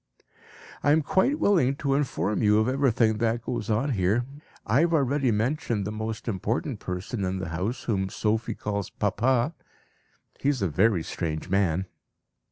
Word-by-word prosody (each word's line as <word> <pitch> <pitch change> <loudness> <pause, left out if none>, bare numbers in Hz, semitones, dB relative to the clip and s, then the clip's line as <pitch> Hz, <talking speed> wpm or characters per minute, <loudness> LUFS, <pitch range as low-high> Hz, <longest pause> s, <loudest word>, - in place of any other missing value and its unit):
"I 145 - +4
am 160 0 +3
quite 220 - +2
willing 160 - +3
to 140 -1 -1
inform 105 - 0
you 105 -1 +4
of 110 +1 +2
everything 125 -5 +2
that 115 0 0
goes 120 -3 -3
on 115 +7 +1
here. 105 +2 +1 0.4
I 120 +5 +3
have 170 +1 +3
already 140 -2 +2
mentioned 115 -1 0
the 105 - -3
most 110 +1 -5
important 115 +4 -2
person 95 +4 -4
in 95 0 -1
the 95 -1 -4
house, 95 +9 -3
whom 95 -4 -1
Sophie 110 +3 -1
calls 100 -2 -3
'Papa.' 120 - +1 0.9
He 140 - +1
is 130 -8 0
a - - +3
very 95 +2 +2
strange 80 0 -4
man." 95 -2 +1
110 Hz, 165 wpm, -26 LUFS, 100-130 Hz, 0.9 s, I